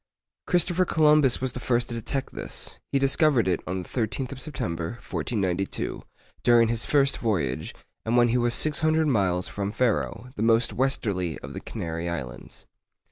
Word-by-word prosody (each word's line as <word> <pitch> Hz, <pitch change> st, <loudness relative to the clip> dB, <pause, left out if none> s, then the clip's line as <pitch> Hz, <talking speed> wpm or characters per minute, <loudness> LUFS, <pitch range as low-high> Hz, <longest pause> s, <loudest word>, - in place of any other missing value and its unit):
Christopher 180 Hz, 0 st, +3 dB
Columbus 150 Hz, -6 st, +4 dB
was 130 Hz, -1 st, -1 dB
the 125 Hz, -, -6 dB
first 120 Hz, -1 st, 0 dB
to -, -, -4 dB
detect 120 Hz, +4 st, -4 dB
this. -, -, -5 dB
He -, -, +2 dB
discovered 135 Hz, -, +3 dB
it 90 Hz, -, +1 dB
on 90 Hz, 0 st, -3 dB
the -, -, -13 dB
13th 125 Hz, +2 st, -2 dB
of 135 Hz, -2 st, -7 dB
September, 85 Hz, -, -4 dB
1492, 100 Hz, -5 st, -3 dB, 0.4 s
during 120 Hz, -1 st, +5 dB
his 115 Hz, -1 st, 0 dB
first 140 Hz, -1 st, +2 dB
voyage, 85 Hz, -, -1 dB, 0.3 s
and 115 Hz, +2 st, +1 dB
when 120 Hz, 0 st, +5 dB
he 120 Hz, -, +2 dB
was 120 Hz, 0 st, +2 dB
six 155 Hz, -2 st, +3 dB
hundred 160 Hz, 0 st, +2 dB
miles 95 Hz, -10 st, +1 dB
from 100 Hz, 0 st, -3 dB
Ferro, 120 Hz, +1 st, -1 dB
the -, -, -5 dB
most 115 Hz, +1 st, +3 dB
westerly 100 Hz, -, -1 dB
of -, -, -7 dB
the -, -, -6 dB
Canary 85 Hz, +1 st, -4 dB
Islands. 70 Hz, -6 st, -7 dB
120 Hz, 170 wpm, -26 LUFS, 95-135 Hz, 0.4 s, during